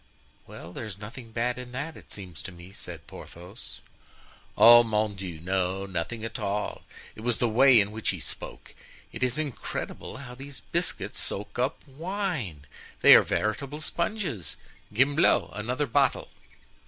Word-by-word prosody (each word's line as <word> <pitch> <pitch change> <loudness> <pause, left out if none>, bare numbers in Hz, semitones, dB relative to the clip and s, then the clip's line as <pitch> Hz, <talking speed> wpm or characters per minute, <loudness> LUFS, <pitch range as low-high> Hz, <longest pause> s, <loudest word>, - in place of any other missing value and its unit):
'" - - -31
"Well, 85 +2 -10
there's 105 -3 -6
nothing 115 +3 -9
bad 120 +2 -1
in 125 0 -9
that, 145 +5 -4
it - - -14
seems 90 -5 -7
to - - -7
me," 90 +1 -12
said - - -6
Porthos. 90 +6 -11 0.8
"Oh, 120 +1 +10
mon 110 -2 0
Dieu! 95 -5 -6
no, 95 +2 -1
nothing 95 +5 -3
at 115 - -5
all. 100 +1 -2 0.3
It - - -10
was 120 0 +1
the 120 - +2
way 125 +2 +7
in 105 0 +1
which 110 +1 -2
he 95 - -1
spoke. 75 - -8 0.4
It - - -8
is 125 +2 +1
incredible 145 -3 -4
how 125 -2 -9
these 135 +2 -9
biscuit 135 - -1
soak 105 +4 -4
up 130 +4 -1
wine! 155 - -3 0.4
They - - +10
are - - +10
veritable 140 +7 -1
sponges! 170 - -2 0.4
Gimblou, 135 +8 +4
another 125 +7 -1
bottle." 140 -2 +2
115 Hz, 155 wpm, -28 LUFS, 100-135 Hz, 0.8 s, Oh